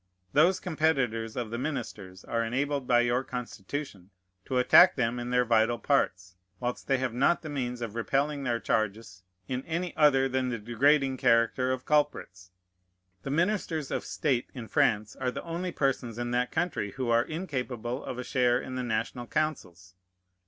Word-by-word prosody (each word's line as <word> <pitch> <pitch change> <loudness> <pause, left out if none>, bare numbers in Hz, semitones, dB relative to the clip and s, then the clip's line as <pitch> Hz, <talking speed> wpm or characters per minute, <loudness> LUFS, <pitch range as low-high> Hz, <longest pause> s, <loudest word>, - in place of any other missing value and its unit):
Those 175 +6 +4
competitors 135 - 0
of 120 -3 -4
the 115 - -3
ministers 110 -10 -5
are 115 0 -1
enabled 135 +3 -1
by 120 -1 +5
your 120 +2 +1
Constitution 120 -4 -6 0.4
to 130 - -1
attack 125 +8 +7
them 120 -1 0
in 120 0 -4
their 125 0 +2
vital 115 0 +3
parts, 90 -11 0 0.2
whilst 125 0 -4
they 135 - +3
have 130 -2 -2
not 140 +9 +2
the 155 - -6
means 125 -3 -3
of 115 -3 -4
repelling 140 +5 0
their 120 -3 0
charges 110 -3 -2 0.3
in 130 0 -3
any 170 +2 -3
other 135 -3 +4
than 130 -1 -1
the 120 - -2
degrading 130 +5 +2
character 115 +2 +2
of 130 0 -3
culprits. 145 -12 0 0.7
The - - -6
ministers 165 -2 0
of - - -2
state 130 -5 -1
in 120 -3 -7
Prance 110 -7 +1
are 130 -1 -1
the - - -5
only 175 +2 -4
persons 130 -6 -1
in 120 0 -3
that 125 0 0
country 160 - -2
who 125 -2 -2
are 115 0 +5
incapable 130 -6 -4
of 125 - -5
a 125 - -4
share 125 -1 +2
in 130 - -7
the 130 - -2
national 120 +1 -3
councils. 95 - -3
125 Hz, 175 wpm, -28 LUFS, 115-140 Hz, 0.7 s, attack